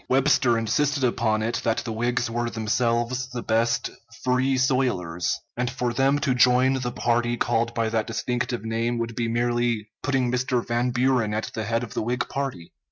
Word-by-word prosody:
Webster 135 -3 +3
insisted 135 +6 0
upon 110 -3 +1
it 115 +2 -1
that 115 -1 +1
the 115 - -3
Whigs 120 +2 0
were 120 +1 -2
themselves 120 +2 0
the 125 -2 -5
best 115 +1 +1 0.3
"Free 130 +1 +2
soilers," 125 -10 0 0.2
and 125 0 -1
for 120 0 -2
them 135 +3 +3
to 135 -2 +2
join 125 +1 +4
the 125 -2 -2
party 120 -1 0
called 115 0 0
by 115 -1 +1
that 110 -1 -1
distinctive 120 0 -2
name 115 +2 -1
would 115 0 -3
be 115 0 -1
merely 120 -2 0
putting 135 -3 0
Mr. 125 -1 0
Van 120 +1 +1
Buren 125 -3 +1
at 110 - -3
the 110 - -3
head 115 +2 0
of 120 - -7
the - - -1
Whig 120 +3 -1
party. 135 -12 -4
120 Hz, 180 wpm, -25 LUFS, 115-125 Hz, 0.3 s, join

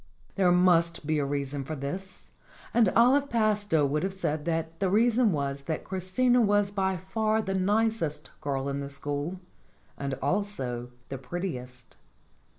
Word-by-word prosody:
There 185 -3 +3
must 170 -3 +3
be 155 0 +1
a 145 - 0
reason 140 0 -2
for 155 +4 -5
this, 185 +8 -7 0.4
and 230 -5 +5
Olive 270 +5 +5
Pastowe 210 -8 +2
would 145 +2 0
have 190 +1 -2
said 155 -5 -2
that 165 0 -2
the 195 - +1
reason 230 +2 +3
was 140 -2 -2
that 160 -2 -3
Christina 195 +7 +1
was 205 -2 +2
by 190 -2 0
far 215 +5 0
the 195 -3 -2
nicest 195 -5 0
girl 140 -2 -2
in 140 0 -2
the 140 0 -5
school 145 +5 -4 0.6
and 140 -1 -3
also 135 -8 -2 0.2
the 135 - -5
prettiest. 125 -6 -6
175 Hz, 155 wpm, -28 LUFS, 140-205 Hz, 0.6 s, and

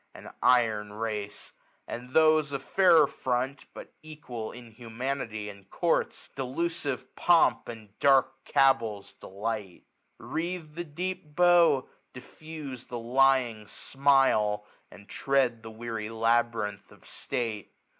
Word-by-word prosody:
An - - -11
iron 110 -4 +2
race! 105 -2 -5 0.4
and 125 +2 -7
those 155 -2 +4
of 140 - -4
jfairer 170 -6 +5
.&ont^ 130 +2 -2 0.2
B}it 155 -1 -12
^ual 115 -3 -6
inhumanity, 115 -1 -5
in 100 -2 -11
courts. 170 - -1
Delusive 135 -1 -3
pomp, 175 -1 +3
a^d 110 -3 -9
dark 135 -1 +3
cabals, 115 -7 +1
delight; 100 -1 -6 0.3
Wreathe 165 -1 -5
the 175 +2 -5
deep 165 -1 -6
bow, 175 -6 +4 0.3
diffuse 140 -1 -9
the 120 - -5
lying 120 -2 +2
smile. 135 -7 +2 0.2
And 100 - -15
tread 130 -4 0
the 115 - -9
w 115 +1 -7
eary 110 0 -5
labyrinth 115 -3 0
of - - -19
state. 110 -4 -4
125 Hz, 115 wpm, -28 LUFS, 110-140 Hz, 0.4 s, jfairer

